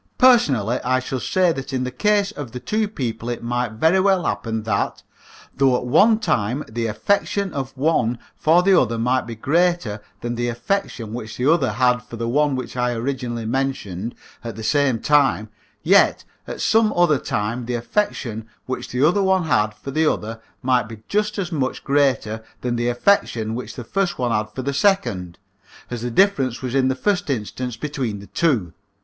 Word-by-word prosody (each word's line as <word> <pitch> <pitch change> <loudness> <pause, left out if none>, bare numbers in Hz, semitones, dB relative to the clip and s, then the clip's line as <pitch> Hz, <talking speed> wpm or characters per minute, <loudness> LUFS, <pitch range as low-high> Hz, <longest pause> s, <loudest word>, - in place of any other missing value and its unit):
Personally, 135 - +4
I 130 +1 +2
should 130 0 -4
say 185 -2 +2
that 135 -3 -5
in 130 -1 -1
the 125 - -3
case 205 +8 +1
of 145 - -7 0.2
two 215 0 0
people 120 - -4
it 120 - -4
might 120 -1 -1
very 160 +11 +3
well 190 -2 +2
happen 110 -1 -2
that, 105 -3 -1 0.5
though 135 -2 +3
at 125 - -5
one 215 - +5
time 140 - 0
the 115 +1 -2
affection 195 - 0
of 135 -1 -5
one 130 -5 +1 0.2
for 170 +3 +3
the 190 -1 +5
other 115 - -1
might 125 +2 0
be 115 - -6
greater 145 -5 +1 0.2
than 120 0 -3
the 120 0 -2
affection 120 - -2
which 115 -2 -6
the 125 - -1
other 170 - +1
had 125 -1 +2
for 125 -1 -10
the 115 0 -3
one 145 +3 +2
which 130 -1 -5
I 125 -1 0
originally 120 -1 -3
mentioned 115 -5 -2 0.3
at 115 -3 -6
the 110 - -7
same 140 -1 +2
time, 140 -6 +2 0.3
yet - - +4 0.2
at - - -6
some 220 -1 +3
other 170 -5 +4
time 115 +3 -3
the 125 - -1
affection 115 - -2 0.2
which 130 - -4
the 130 +4 +3
other 200 +5 +2
one 190 -1 +2
had 110 -8 +1
for 135 +6 -8
the 155 +2 +3
other 115 +1 -5 0.2
might 125 -3 +2
be 110 -1 -10
just 210 +1 0
as 185 -3 -3
much 135 -5 -2
greater 130 -6 +1 0.2
than 125 -1 -1
the 120 0 -1
affection 120 - +1
which 125 +2 -6
the 120 - -6
first 185 - -1
one 125 -2 0
had 105 -1 0
for 130 +4 -6
the 140 +2 -2
second, 120 - +1 0.5
as 120 -2 -4
the 120 - -2
difference 135 - +2
was 125 -1 -3
in 135 -1 +3
the 130 - +1
first 195 +3 0
instance 125 0 -3
between 125 -6 -3
the 100 - -11
two. 110 - 0
125 Hz, 190 wpm, -21 LUFS, 115-160 Hz, 0.5 s, one